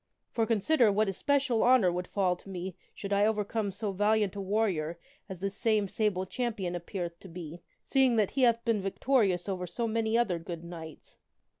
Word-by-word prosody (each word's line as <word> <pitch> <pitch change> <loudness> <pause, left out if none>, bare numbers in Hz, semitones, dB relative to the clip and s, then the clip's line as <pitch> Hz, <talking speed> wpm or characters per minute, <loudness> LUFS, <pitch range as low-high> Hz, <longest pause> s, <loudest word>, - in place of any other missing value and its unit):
For, 225 -2 0
consider, 230 +2 +3
what 210 +2 +2
especial 265 +3 +1
honor 245 -8 +5
would 180 +1 -3
fall 185 -3 +1
to 195 - -15
me 185 -1 -5 0.2
should 200 0 -4
I 200 +1 +4
overcome 215 -1 -1
so 200 +2 -3
valiant 205 0 +1
a 200 - -4
warrior 190 -5 0 0.3
as 185 -2 -7
this 195 0 -2
same 215 -2 +1
Sable 190 -2 0
Champion 210 -5 -3
appeareth 175 -1 -5
to - - -12
be, 170 -1 -8 0.2
seeing 265 -3 +3
that 215 -3 +2
he 270 - -1
hath 235 -2 +3
been 225 -3 +1
victorious 195 -2 +1
over 185 -2 -3
so 235 +5 -2
many 225 0 +1
other 200 -8 +1
good 170 0 -7
knights." 165 -2 -10
200 Hz, 185 wpm, -30 LUFS, 180-225 Hz, 0.3 s, honor